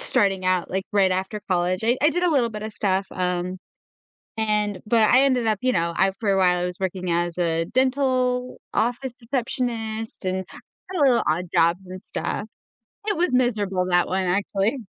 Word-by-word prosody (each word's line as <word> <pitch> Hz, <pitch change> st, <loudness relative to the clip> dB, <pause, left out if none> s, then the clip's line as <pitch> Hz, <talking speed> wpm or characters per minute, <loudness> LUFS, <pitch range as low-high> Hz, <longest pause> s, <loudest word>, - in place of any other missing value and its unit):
starting 195 Hz, -6 st, +2 dB
out, 185 Hz, -1 st, +1 dB
like, 190 Hz, +1 st, -1 dB
right 195 Hz, -2 st, +3 dB
after 190 Hz, +3 st, -3 dB
college. 180 Hz, +2 st, +1 dB
I 240 Hz, +3 st, +3 dB
I 300 Hz, -, +5 dB
did 355 Hz, +3 st, 0 dB
a 355 Hz, -, +3 dB
little 255 Hz, -6 st, +2 dB
bit 210 Hz, -1 st, -6 dB
of 220 Hz, -, -5 dB
stuff, 195 Hz, -2 st, 0 dB
um, 180 Hz, 0 st, -2 dB, 0.8 s
and 210 Hz, -3 st, 0 dB
but 220 Hz, -1 st, +4 dB
I 255 Hz, +2 st, +6 dB
ended 255 Hz, -4 st, +2 dB
up, 215 Hz, -1 st, +2 dB
you 255 Hz, 0 st, +2 dB
know, 170 Hz, 0 st, 0 dB
I 195 Hz, 0 st, +3 dB
for 210 Hz, -, 0 dB
a 195 Hz, -, +2 dB
while, 180 Hz, -2 st, +3 dB
I -, -, -1 dB
was 180 Hz, 0 st, -5 dB
working 185 Hz, -1 st, -2 dB
as 175 Hz, 0 st, 0 dB
a 165 Hz, -2 st, 0 dB
dental 255 Hz, +2 st, +1 dB, 0.2 s
office 245 Hz, +3 st, 0 dB
receptionist 230 Hz, -3 st, -3 dB
and 185 Hz, 0 st, -1 dB
had 375 Hz, 0 st, -11 dB
a -, -, +6 dB
little 250 Hz, -3 st, +4 dB
odd 165 Hz, +4 st, 0 dB
jobs 170 Hz, +3 st, +3 dB
and 185 Hz, 0 st, -8 dB
stuff. 210 Hz, -, -3 dB, 0.6 s
It 420 Hz, -, +1 dB
was 340 Hz, -6 st, +1 dB
miserable 210 Hz, -7 st, +1 dB
that 175 Hz, 0 st, +3 dB
one, 190 Hz, 0 st, 0 dB
actually. 200 Hz, +6 st, 0 dB
205 Hz, 195 wpm, -23 LUFS, 185-245 Hz, 0.8 s, I